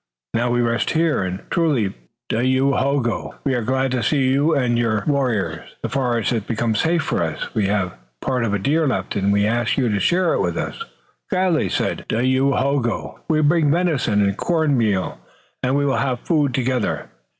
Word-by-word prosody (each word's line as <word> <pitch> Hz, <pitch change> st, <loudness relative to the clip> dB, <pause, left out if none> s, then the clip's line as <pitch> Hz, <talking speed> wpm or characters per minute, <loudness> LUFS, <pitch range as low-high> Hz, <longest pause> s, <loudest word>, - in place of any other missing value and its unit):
Now 120 Hz, +1 st, +1 dB
we 120 Hz, 0 st, +2 dB
rest 115 Hz, -1 st, 0 dB
here, 160 Hz, -4 st, +1 dB
and 95 Hz, 0 st, -3 dB
truly, 145 Hz, -, +1 dB, 0.3 s
Dayohogo, 130 Hz, +1 st, 0 dB
we 135 Hz, -, 0 dB
are 125 Hz, -, 0 dB
glad 130 Hz, +3 st, 0 dB
to 125 Hz, -2 st, 0 dB
see 130 Hz, +3 st, +2 dB
you 145 Hz, +4 st, +2 dB
and 125 Hz, -4 st, +1 dB
your 115 Hz, -3 st, +1 dB
warriors. 110 Hz, -, -1 dB
The -, -, -2 dB
forest 125 Hz, -5 st, 0 dB
has 115 Hz, -3 st, 0 dB
become 115 Hz, +2 st, -1 dB
safe 160 Hz, +8 st, +1 dB
for -, -, -1 dB
us. -, -, -3 dB
We 105 Hz, -3 st, +1 dB
have 95 Hz, -3 st, 0 dB, 0.3 s
part 125 Hz, -, -1 dB
of 115 Hz, -, 0 dB
a 105 Hz, -, +1 dB
deer 150 Hz, -, +1 dB
left, 130 Hz, -, -2 dB
and 100 Hz, 0 st, +1 dB
we 100 Hz, 0 st, +3 dB
ask 120 Hz, +2 st, 0 dB
you 130 Hz, -4 st, +2 dB
to 105 Hz, -1 st, 0 dB
share 175 Hz, -, +2 dB
it -, -, +1 dB
with -, -, -1 dB
us." 460 Hz, -, -4 dB, 0.5 s
"Gladly," 185 Hz, -5 st, +1 dB
said -, -, -2 dB
Dayohogo. 130 Hz, +1 st, 0 dB
"We 155 Hz, -1 st, +3 dB
bring 155 Hz, 0 st, +3 dB
venison 145 Hz, -, +2 dB
and 100 Hz, -1 st, +1 dB
corn 160 Hz, +1 st, +1 dB
meal, 95 Hz, -, 0 dB, 0.4 s
and 130 Hz, +1 st, +1 dB
we 145 Hz, 0 st, +2 dB
will 135 Hz, -, +1 dB
have 125 Hz, -3 st, -1 dB
food 145 Hz, -6 st, +1 dB
together." 130 Hz, -3 st, -1 dB
130 Hz, 185 wpm, -21 LUFS, 110-145 Hz, 0.5 s, we